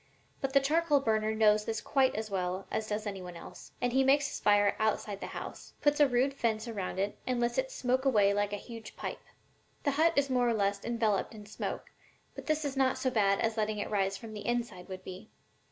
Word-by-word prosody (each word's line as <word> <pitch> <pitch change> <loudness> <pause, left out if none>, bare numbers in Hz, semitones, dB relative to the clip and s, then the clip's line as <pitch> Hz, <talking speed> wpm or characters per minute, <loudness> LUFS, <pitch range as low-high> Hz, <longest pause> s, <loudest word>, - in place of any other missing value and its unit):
But 270 -1 -2
the 275 - +7
charcoal 300 +1 +2
burner 220 -3 +1
knows 215 -1 +4
this 225 -1 -2
quite 265 -2 +2
as 215 0 -4
well 185 0 -2
as 220 - -2
does 210 +1 -2
any 195 -2 -4
one 180 -1 -8
else, 170 - -11
and 245 -1 0
he 265 +1 +4
makes 280 +2 +4
his - - -5
fire 205 -1 +4
outside 215 -1 0
of 200 - -7
the - - -5
house, - - -8
puts 290 0 +2
a 290 - +7
rude 260 +2 +2
fence 225 -3 -1
around 200 -5 -4
it 200 +2 -2
and 250 -1 0
lets 240 - +1
it - - -1
smoke 260 - 0
away 210 -7 +4
like 205 0 0
a - - -1
huge 225 +2 -9
pipe. - - -5 0.6
The 285 - +2
hut 320 +4 +3
is 280 0 +3
more 250 -2 +2
or 230 - +1
less 200 -1 0
enveloped 225 -3 0
in 210 -1 -10
smoke, 210 - -5 0.4
but - - -9
this 310 -1 +1
is 280 -1 -2
not 265 -1 +2
so 260 - 0
bad 200 -4 +2
as 225 0 0
letting 215 0 0
it 205 - -4
rise 195 -1 +1
from 225 0 -9
the 210 - -7
inside 235 -7 -2
would 185 0 -7
be. 185 +4 -9
220 Hz, 235 wpm, -31 LUFS, 205-265 Hz, 0.6 s, the